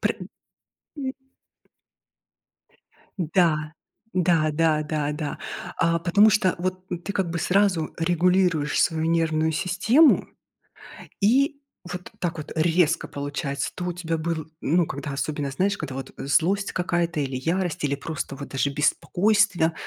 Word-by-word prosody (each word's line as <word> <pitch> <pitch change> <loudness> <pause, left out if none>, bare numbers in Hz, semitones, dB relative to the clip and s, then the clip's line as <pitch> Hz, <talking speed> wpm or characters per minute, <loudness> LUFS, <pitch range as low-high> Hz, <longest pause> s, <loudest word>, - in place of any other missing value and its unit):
Пры - - 0 0.8
м 265 -2 -3 2.1
Да 160 -3 +1 0.4
да 170 -3 +2
да 155 0 +2
да 150 -1 -2
да. 150 0 -4 0.4
А. 170 0 +2
Потому 200 +6 +5
что 210 -4 +2
вот 185 +1 -3 0.2
ты 200 - -3
как 190 -4 -1
бы 170 - -2
сразу 185 -4 +2
регулируешь 175 -2 +2
свою 160 -1 +1
нервную 160 -1 +1
систему, 215 - +3 0.9
и 275 +7 +3 0.3
вот 180 0 -7
так 170 -2 -2
вот 155 - -7
резко 165 0 +2
получается. 140 -1 -3
То 180 - -4
у 180 - -2
тебя 165 -2 -3
был, 160 -1 -3
ну, 170 +3 +2
когда 145 +1 -5
особенно, 140 0 -3
знаешь, 200 +8 0
когда 140 -4 -5
вот, 135 - -6
э, - - -6
злость 185 +7 +2
какая-то 175 -2 -1
или 135 -2 -2
ярость, 170 +4 -1
или 140 -1 +1
просто 145 -1 -5
вот 140 0 -7
даже 140 +1 0
беспокойство, 175 +3 +2
165 Hz, 135 wpm, -24 LUFS, 155-185 Hz, 2.1 s, Потому